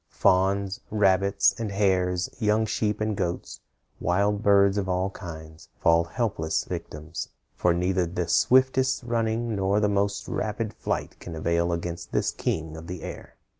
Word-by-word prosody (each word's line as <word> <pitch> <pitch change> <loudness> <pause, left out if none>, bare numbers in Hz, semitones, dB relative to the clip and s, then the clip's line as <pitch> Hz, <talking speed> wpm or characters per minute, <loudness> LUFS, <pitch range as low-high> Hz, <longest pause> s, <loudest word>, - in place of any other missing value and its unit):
Fawns, 95 +1 +2
rabbits, 100 -1 +3
and 110 -3 -3
hares, 95 -2 +1
young 110 0 +2
sheep 105 -1 -1
and 110 -1 0
goats, 90 -2 -3 0.4
wild 100 +4 +1
birds 100 -1 +4
of 95 -2 -3
all 90 +1 0
kinds, 80 -4 -10
fall 85 0 +4
helpless 85 -5 -1
victims, 75 +2 -6 0.2
for 90 - +2
neither 90 +1 +1
the 90 0 -3
swiftest 130 +5 +3
running 115 -1 -1
nor 100 +1 +1
the 105 - +2
most 100 0 0
rapid 110 0 -2
flight - - -3
can 85 - -8
avail 85 +2 0
against 85 0 -4
this - - +1
king 80 -1 -3
of 80 +1 -9
the 90 -2 -6
air. - - -8
95 Hz, 150 wpm, -26 LUFS, 85-105 Hz, 0.4 s, birds